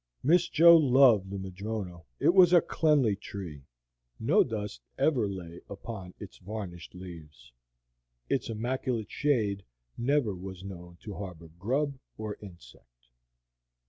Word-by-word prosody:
Miss 170 +5 +4
Jo 170 +2 +8
loved 130 - +5
the 100 - -4
madrono. 95 -2 -5
It - - +4
was 180 -2 +7
a 175 - +9
cleanly 145 -10 +2
tree; 90 -8 -8 0.5
no - - +4
dust 105 - -5 0.2
ever 125 -10 +2
lay 85 -3 -8
upon 100 -2 -8
its - - -10
varnished 90 -4 -7
leaves; 75 -9 -11 0.8
its - - -1
immaculate 120 0 -2
shade 110 -10 +1 0.4
never 125 -3 +1
was 95 0 -8
known 90 -3 -9
to 105 - -6
harbor 90 -5 -8
grub 135 +7 -1 0.2
or 110 -1 -5
insect. - - -15
100 Hz, 125 wpm, -29 LUFS, 90-125 Hz, 0.8 s, a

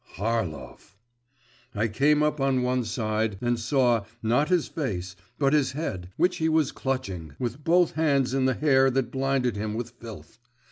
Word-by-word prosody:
Harlov! 90 - -4 0.8
I 105 +2 +1
came 145 +7 +2
up 150 0 0
on 135 -2 +2
one 125 0 +1
side, 110 -2 -1
and 120 +1 0
saw, 120 -2 +2 0.2
not 125 +8 +2
his 180 -4 +2
face, 95 - -4 0.2
but 140 -1 +2
his 145 -4 +2
head, 95 - -4
which 180 - +2
he 160 0 +1
was 155 -3 +2
clutching, 95 - -4
with 125 +4 -4
both 175 +1 +3
hands 140 -5 +1
in 135 -1 +1
the 130 -1 +2
hair 135 -3 +4
that 130 -2 -1
blinded 135 -3 0
him 105 +1 -3
with 120 +1 -4
filth. 115 -3 -12
125 Hz, 170 wpm, -26 LUFS, 110-140 Hz, 0.8 s, hair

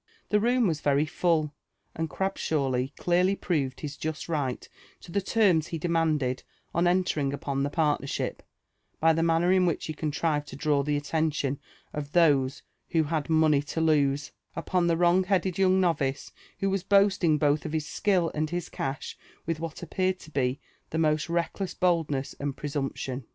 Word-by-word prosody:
The 210 - +3
room 245 +2 +2
was 160 -6 0
very 145 +1 +2
fdll, 160 -2 +1 0.4
and 160 0 -2
Grabshawly 140 -9 -1
clearly 180 +2 +2
proved 140 -9 -2
his 150 -1 -5
just 155 0 -4
right 145 -6 -2 0.3
to 170 - -12
the 200 - 0
terms 185 -6 +3
he 165 - -4
demanded 155 -6 0 0.3
on 170 +1 +2
entering 175 -6 +1
upon 140 -1 -2
the 140 - 0
partnership, 150 -3 -1 0.6
by 165 +1 +5
the 165 - 0
manner 165 +2 +3
in 185 -1 +4
which 165 - -1
he 155 - -4
contrived 150 0 -1
to - - -9
draw 145 -1 +1
the 145 +1 0
attention 145 -2 -1 0.3
of 145 -1 -5
those 145 -6 +3 0.3
who 165 -2 +2
had 155 0 -2
money 155 -3 +4
to 145 +3 -5
lose*' 145 -3 +2 0.2
upon 175 +1 0
the 165 -1 +2
wrong 175 +2 +4
headed 190 -1 0
young 190 0 +4
novice 145 -7 0 0.3
who 195 0 +1
was 195 -1 0
boasting 195 -4 +3
both 150 0 +2
of 155 - -5
his 155 -1 -1
skill 180 0 +1
and 155 0 -1
his 175 0 -3
cash 135 +2 -4 0.3
with 165 -1 -2
what 165 +1 -6
appeared 185 +2 0
to 155 - -13
be 130 -1 0 0.3
the 160 - -3
most 155 0 +1
reckless 170 +3 -2
boldness 160 -7 0
and 140 -1 -3
presumption. 135 -2 -3
160 Hz, 170 wpm, -27 LUFS, 145-175 Hz, 0.6 s, by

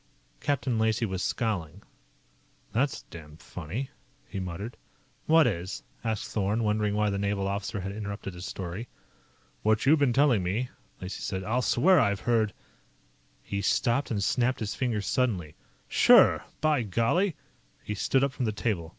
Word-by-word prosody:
Captain 130 - 0
Lacey 110 +1 +2
was 95 -3 -3
scowling. 100 -11 -2 0.9
"That's 125 +5 0
damned 75 -1 -12
funny," 90 - -6 0.4
he 100 - -5
muttered. 95 +5 -5 0.5
"What 160 0 +6
is?" 90 +3 -2 0.2
asked 110 -2 -2
Thorn, 105 +2 0
wondering 105 -1 +1
why 105 -1 +2
the 100 - -2
naval 100 -1 0
officer 100 +1 -3
had 95 +1 -4
interrupted 100 -2 -5
his 90 +1 -7
story. 95 +5 -5 0.7
"What 110 +2 +2
you've 150 +3 +5
been 140 -3 +3
telling 130 -5 +4
me," 105 +8 -1 0.3
Lacey 90 +1 -6
said. 95 -1 -3
"I'll 115 +6 0
swear 165 +9 +4
I've 100 -6 +1
heard 115 -3 +2 0.5
" - - -37
He 100 0 -3
stopped 120 +7 +1
and 105 -4 -1
snapped 125 +4 +1
his 105 -2 -2
fingers 115 -6 -1
suddenly. 95 -12 0 0.3
"Sure! - - +6 0.2
By 155 -4 +3
golly!" 120 - +1 0.5
He 105 - -3
stood 130 +6 +1
up 140 - +2
from 125 - -2
the 110 - +1
table. 105 -6 -2
105 Hz, 160 wpm, -28 LUFS, 95-125 Hz, 0.9 s, What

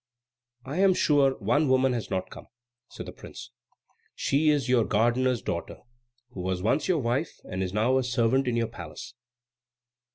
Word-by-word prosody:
"I 145 +7 -4
am 190 -1 +5
sure 140 -5 +3
one 140 +8 +1
woman 130 0 +3
has 120 -3 -4
not 95 0 -3
come," - - -11 0.4
said - - -8
the - - -7
prince. - - -11 0.6
"She 150 +3 +1
is 145 -4 +1
your 125 -2 +3
gardener's 120 +3 +1
daughter, 85 - -5 0.5
who 95 - -7
was 90 0 -2
once 140 +8 +1
your 185 - +2
wife 120 -2 -1
and 95 +1 -5
is 95 -1 -2
now 115 +6 +2
a - - -1
servant 125 +1 +1
in 120 - 0
your 115 0 +1
palace." 85 -9 -9
125 Hz, 170 wpm, -27 LUFS, 105-135 Hz, 0.6 s, am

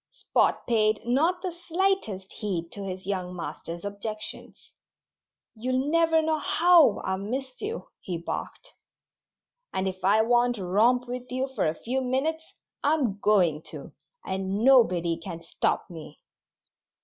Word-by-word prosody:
Spot - - 0
paid 215 -2 +1
not 325 +9 +1
the 370 - -2
slightest 345 - -1
heed 175 -5 -3
to 200 - -7
his 185 -1 -6
young 185 -2 -3
master's 170 0 -6
objections. 215 +1 -7 0.8
"You'll 255 +5 -1
never 325 -1 +4
know 315 0 +1
how 350 - +5
I've 190 0 -1
missed 255 +5 -4
you," 440 +3 -4
he 180 -2 -4
barked. - - -6 1.0
"And 190 0 -1
if 185 0 -5
I 210 +4 +4
want 240 +1 +3
to 195 -5 -5
romp 235 +7 +3
with 250 0 -6
you 260 +1 -1
for 240 -10 0
a 155 - -1
few 255 +9 -2
minutes, 290 +6 -1 0.3
I'm 275 -10 +1
going 180 -8 +3
to; - - -9 0.3
and 190 +2 -2
nobody 180 -11 +4
can 170 -1 -7
stop 165 - -1
me." 160 -3 -11
225 Hz, 140 wpm, -27 LUFS, 190-270 Hz, 1.0 s, how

